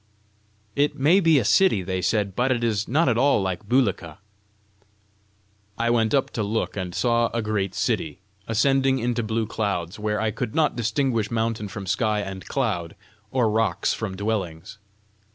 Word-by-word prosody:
"It 145 +1 +1
may 155 +8 +4
be 165 -5 +4
a 120 - +1
city," 185 - +4
they 95 0 -2
said, 100 -1 0
"but 125 +2 +1
it 120 -2 0
is 110 -3 0
not 155 +6 +2
at 120 -2 +2
all 140 -1 +4
like 95 +1 -3
Bulika." 100 - +1 1.6
I 115 0 +1
went 115 +1 +2
up 135 - +1
to 115 - -3
look, 105 +2 -2
and 90 -3 -4
saw 120 -1 +2
a 115 - 0
great 100 -3 -2
city, 100 -7 -1 0.3
ascending 135 +4 +2
into 120 -1 -1
blue 110 0 -1
clouds, 100 -5 -3
where 105 0 -1
I 110 -1 0
could 110 0 -4
not 155 -4 +2
distinguish 115 -1 0
mountain 115 -2 -1
from 100 0 -7
sky 105 +3 0
and 95 -2 -7
cloud, 85 -1 -2 0.3
or 125 0 +1
rocks 110 -4 +1
from 100 -4 -5
dwellings. 100 -2 -3
110 Hz, 170 wpm, -24 LUFS, 100-120 Hz, 1.6 s, may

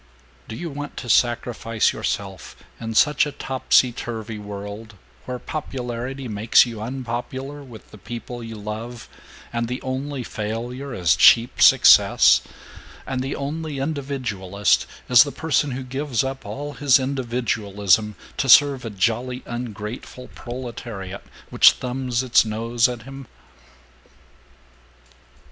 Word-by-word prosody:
"Do 110 - -7
you 170 +2 -6
want 145 +1 -7
to 120 - -6
sacrifice 115 -1 +1
yourself 95 -2 -4 0.2
in 115 -1 -5
such 150 +4 +4
a - - -5
topsy 130 -2 +2
turvy 110 -2 -6
world, 105 +1 -8 0.3
where 125 0 -4
popularity 130 -2 -5
makes 110 +2 +4
you 115 -3 -7
unpopular 130 +3 -5
with 120 -5 -14
the 105 - -13
people 120 +2 -7
you 115 -1 -7
love, 110 +3 -7 0.5
and 115 0 -1
the 125 +2 -4
only 135 +1 -4
failure 120 +6 -5
is 90 -7 +2
cheap 120 +1 +5
success, - - +7 0.6
and 130 -1 -3
the 135 +2 -3
only 150 +1 -4
individualist 120 - -1 0.2
is 125 -2 +7
the 145 - +2
person 155 -2 0
who 130 0 -4
gives 130 -1 -2
up 135 0 -5
all 145 +1 -6
his 140 -3 +4
individualism 110 -6 0 0.2
to 140 -1 -1
serve 140 0 +6
a 115 - -4
jolly 120 +5 -1
ungrateful 120 +1 -7
proletariat 120 -6 -7 0.3
which - - +7
thumbs 125 -1 -3
its 125 -2 +4
nose 115 +2 0
at 120 -3 -6
him?" 135 0 -10
120 Hz, 125 wpm, -22 LUFS, 110-135 Hz, 0.6 s, success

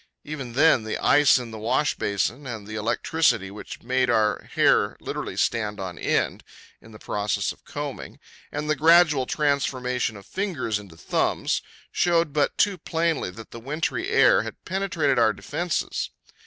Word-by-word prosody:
Even 140 -6 -6
then, 140 -3 +4
the 110 - -3
ice 145 -1 +5
in 120 -2 -6
the 110 - -7
wash 130 +6 +1
basin, 120 +7 -2
and 110 -4 -6
the 110 - -8
electricity 115 0 +1
which 105 - -9
made 125 +1 +1
our 110 -3 +1
hair - - +3
literally - - -5
stand 105 -3 0
on 90 -3 -6
end - - 0 0.4
in 110 - -15
the 105 - -11
process 105 -1 -1
of - - -15
combing, - - -6 0.3
and 150 +1 -4
the 155 - +2
gradual 155 -3 +5
transformation 130 -6 0
of 100 - -13
fingers 155 - -2
into 95 -6 -13
thumbs, - - 0 0.3
showed 170 -4 +2
but 145 -2 +1
too 200 -3 +2
plainly 165 - -1
that 110 +5 -11
the 115 - -8
wintry 150 +7 -2
air - - +5
had - - -9
penetrated 185 -9 0
our 110 -2 +4
defences. 170 +9 -3
130 Hz, 160 wpm, -25 LUFS, 110-155 Hz, 0.4 s, ice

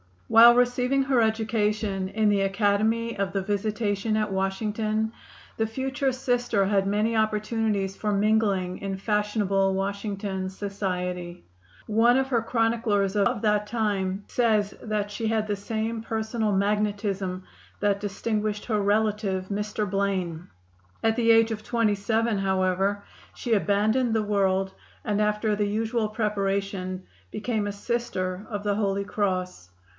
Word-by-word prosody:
While 235 +1 +8
receiving 250 +2 +2
her 265 -3 +2
education 215 -3 0
in 215 +2 +1
the 200 -1 +2
Academy 210 +3 +1
of 195 -1 -1
the 195 - 0
Visitation 205 +1 -1
at 215 -1 -1
Washington 215 +3 -1 0.5
the 220 - +1
future 265 +4 -1
Sister 245 -5 +1
had 195 -1 +1
many 210 +3 +1
opportunities 215 -2 0
for 210 - -1
mingling 200 -3 +1
in 195 -1 -4
fashionable 200 -2 +1
Washington 195 -1 -3
society. 180 -3 -4 0.4
One 230 +3 +4
of 265 0 0
her 240 -4 +2
chroniclers 225 -4 +1
of 215 +2 +2
that 210 -1 +1
time 205 -4 -1
says 215 -4 +1
that 210 -2 -2
she 225 +2 -3
had 220 -1 +1
the 205 - 0
same 220 +2 -3
personal 220 0 -2
magnetism 200 -2 -1 0.4
that 200 -1 +2
distinguished 210 +1 -2
her 215 -3 0
relative, 205 -2 0
Mr. 210 +1 -2
Blaine. 185 -4 -2 0.6
At 225 0 +3
the 230 -1 +2
age 225 0 +5
of 215 -1 -3
twenty 230 -1 +1
seven, 220 +1 0
however, 190 +1 0 0.3
she 240 - -1
abandoned 220 +4 +2
the 220 - +2
world, 195 -2 +1 0.3
and 210 -1 0
after 210 0 +1
the 205 -1 +1
usual 220 +2 0
preparation 195 -3 -2 0.3
became 215 -1 -2
a - - -2
Sister 200 -4 -3
of 205 -3 -4
the 205 -1 +1
Holy 200 -1 0
Cross. 185 - -2
210 Hz, 135 wpm, -26 LUFS, 195-220 Hz, 0.6 s, While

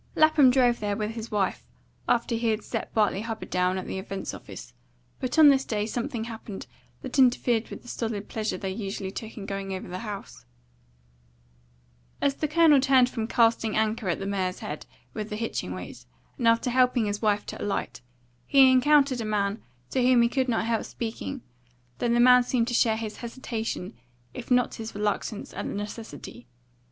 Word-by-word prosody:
Lapham 310 -4 +6
drove 245 -2 +3
there 205 -1 -2
with 215 0 -2
his 225 0 -7
wife 205 -3 -1 0.5
after 235 0 +2
he 230 0 0
had 215 -1 0
set - - -4
Bartley 210 -2 +1
Hubbard 225 0 -6
down 180 0 +1
at 185 - -4
the 190 - -4
Events 195 0 -5
office, - - -10 0.5
but 255 +2 -3
on 310 -2 +9
this 270 -1 +4
day 210 -4 -2
something 230 0 -3
happened 225 -3 -7 0.4
that 260 +1 -2
interfered 245 -3 +3
with - - -9
the - - -16
solid 220 -4 -4
pleasure 220 -1 -3
they 190 -2 -4
usually 195 -1 -4
took 220 +3 -8
in 200 - -6
going 195 -1 -4
over 185 - -7
the 180 +1 -5
house. 200 - -7 1.8
As 280 - +2
the 305 - -2
Colonel 305 -2 +5
turned 260 -2 +4
from 225 -2 -3
casting 230 -2 +2
anchor 220 -2 0
at 170 - 0
the 195 - -5
mare's 190 -2 -1
head 150 - -6 0.3
with 215 -1 -5
the 210 - -4
hitching 220 - -3
weight, 90 -9 -8 0.4
after 230 +2 +3
helping 250 -2 +3
his 205 0 -3
wife 210 -2 +1
to - - -7
alight, 205 - -3 0.5
he 270 -2 +7
encountered 275 -1 +4
a - - -2
man 210 0 -1 0.3
to 260 - +1
whom 250 -1 +5
he 235 - +3
could 260 0 0
not 225 -1 +1
help 230 -1 0
speaking, 235 +3 -5 0.6
though 240 - 0
the 235 0 +3
man 250 +1 +7
seemed 245 -1 0
to - - -3
share 225 -2 +3
his 220 -1 -5
hesitation 230 -5 -5 0.4
if - - -8
not 250 -1 +3
his 225 -1 -7
reluctance 210 +1 -2
at - - -4
the - - -4
necessity. 205 - -7
225 Hz, 185 wpm, -26 LUFS, 205-250 Hz, 1.8 s, on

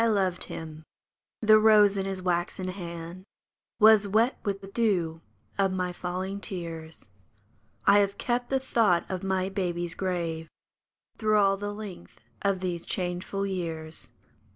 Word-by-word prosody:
1 230 -2 +3
loved 185 -2 0
him. 160 -1 -7 0.6
The 215 -1 +7
rose 210 -2 +6
in 195 -1 -1
his 190 -1 -4
waxen 180 +1 -1
hand 170 -1 -7 0.6
Was 215 -2 +7
wet 220 +5 +3
with 200 -2 -2
the 195 - -9
dew 185 -7 0 0.4
of 195 -1 +3
my 180 -1 -2
falling 185 +3 -4
tears; 165 - -6 0.8
I 205 - +7
have 200 0 +1
kept 245 0 -1
the 270 - +2
thought 225 -9 +2
of 185 -1 -3
my 190 -1 0
baby's 175 -3 -2
grave 170 -3 -2 0.7
Through 215 -1 +3
all 195 -1 +4
the 205 +1 -4
length 205 -5 -9 0.2
of 195 -2 0
these 175 -2 -2
changeful 185 +2 -2
years. 165 -4 -4
190 Hz, 145 wpm, -28 LUFS, 175-205 Hz, 0.8 s, The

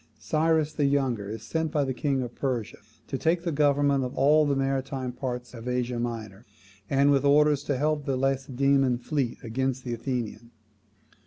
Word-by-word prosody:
Cyrus 155 +4 +1
the 145 -2 +1
Younger 130 -8 0
is 110 0 -6
sent 160 +6 -2
by 150 -3 +1
the 135 -1 -2
king 135 +1 0
of 120 -1 -7
Persia 125 -6 -3 0.3
to 135 - -3
take 170 +1 +1
the 170 - -1
government 145 -2 +2
of 125 - -4
all 150 +3 +4
the 140 - +1
maritime 135 -1 -1
parts 125 -1 -5
of 115 0 -8
Asia 125 -1 -1
Minor, 115 -4 -5 0.5
and 140 +1 +4
with 140 -1 +3
orders 145 0 +4
to 140 - 0
help 150 +1 0
the 135 -1 0
Lacedaemonian 135 -1 +1
fleet 130 -1 -2
against 130 +2 -2
the 120 - -3
Athenian. 115 -2 -4
135 Hz, 175 wpm, -27 LUFS, 125-145 Hz, 0.5 s, all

